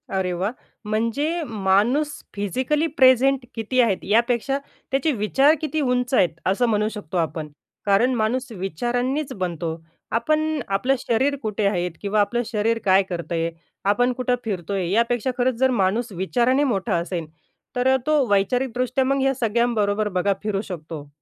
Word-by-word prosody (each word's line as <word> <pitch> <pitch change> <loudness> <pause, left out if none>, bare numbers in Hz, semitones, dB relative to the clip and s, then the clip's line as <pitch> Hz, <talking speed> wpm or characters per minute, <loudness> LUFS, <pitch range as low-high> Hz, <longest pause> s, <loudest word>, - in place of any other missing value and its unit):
अरे 185 -1 0
वाह! 185 +4 -1 0.3
म्हणजे 230 +11 -1
माणूस 220 +5 +1 0.3
फिजिकली 260 - 0
प्रेझेंट 265 -2 +4
किती 230 +3 -1
आहेत? 215 -6 +2
यापेक्षा 235 +5 +1 0.3
त्याचे 275 +4 +1
विचार 270 +6 +3
किती 315 0 -1
उंच 250 -1 0
आहेत, 180 -8 +4 0.2
असं 195 +6 +2
म्हणू 210 -1 +1
शकतो 200 -5 -6
आपण. 160 -2 -2 0.4
कारण 210 +6 +3
माणूस 240 +3 -1
विचारांनीच 245 - -2
बनतो. 170 -5 -3 0.4
आपण 310 +6 +1
आपलं 205 +8 +1
शरीर 260 +5 +1
कुठे 215 -2 -2
आहे? 180 -3 0
किंवा 205 +1 +1
आपलं 240 +4 0
शरीर 225 +1 0
काय 190 0 +5
करतंय, 170 -1 -2 0.4
आपण 245 +5 +3
कुठे 250 0 0
फिरतोय? 190 -3 -2
यापेक्षा 235 +3 +1
खरंच 255 0 +1
जर 265 0 +4
माणूस 220 +5 0
विचाराने 240 +9 +1
मोठा 205 -9 0
असेल 170 -1 -3 0.5
तर 255 +1 +3
तो 305 -2 +3
वैचारिकदृष्ट्या 250 +5 +1
मग 275 +1 +1
ह्या 270 0 +2
सगळ्यांबरोबर 220 -3 +1
बघा 185 +1 +1
फिरू 205 -2 -1
शकतो. 160 -6 -7
230 Hz, 145 wpm, -23 LUFS, 195-260 Hz, 0.5 s, काय